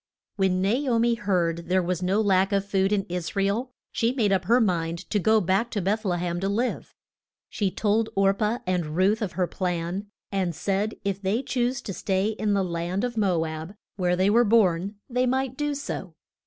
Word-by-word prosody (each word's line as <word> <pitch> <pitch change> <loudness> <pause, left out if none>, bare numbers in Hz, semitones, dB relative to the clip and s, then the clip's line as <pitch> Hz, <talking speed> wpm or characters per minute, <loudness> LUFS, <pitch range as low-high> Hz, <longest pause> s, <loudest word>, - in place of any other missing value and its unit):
When 190 -2 +1
Na 200 +3 +2 0.2
o 230 - +3
mi 235 +1 +3
heard 170 -7 -1
there 185 0 +3
was 180 0 -2
no 190 +4 +2
lack 195 -1 +3
of 200 -1 +1
food 195 -1 +1
in 205 -2 +2
Is 175 -1 -5
ra 195 - +2
el, 225 +6 -1 0.2
she 230 0 +1
made 230 -6 +1
up 190 -2 +1
her 235 +5 +4
mind 170 -6 -1
to 210 - +2
go 220 +3 +4
back 195 +5 +1
to 215 - -2
Beth 205 +4 0
le 180 -4 0
hem 175 0 -2
to 195 +2 -1
live. 235 +5 -2 0.5
She 205 -4 0
told 220 +3 +1
Or 195 0 +4
pah 215 +4 -1
and 175 -4 -1
Ruth 200 +5 +2
of 205 -5 -2
her 185 - +1
plan, 180 +2 -3 0.2
and 185 -4 -1
said 200 +6 -1
if 200 -1 -1
they 205 +6 0
choose 250 -1 -1
to 195 - -5
stay 190 +2 0
in 215 -1 -1
the 200 -1 +2
land 175 +3 -2
of 245 -1 -2
Mo 185 -7 +1
ab, 160 +4 -6 0.2
where 180 -2 +1
they 190 +3 +3
were 235 +3 +5
born, 200 -3 +2
they 250 0 +1
might 260 0 0
do 295 +1 -1
so. 195 - -5
195 Hz, 215 wpm, -25 LUFS, 180-220 Hz, 0.5 s, were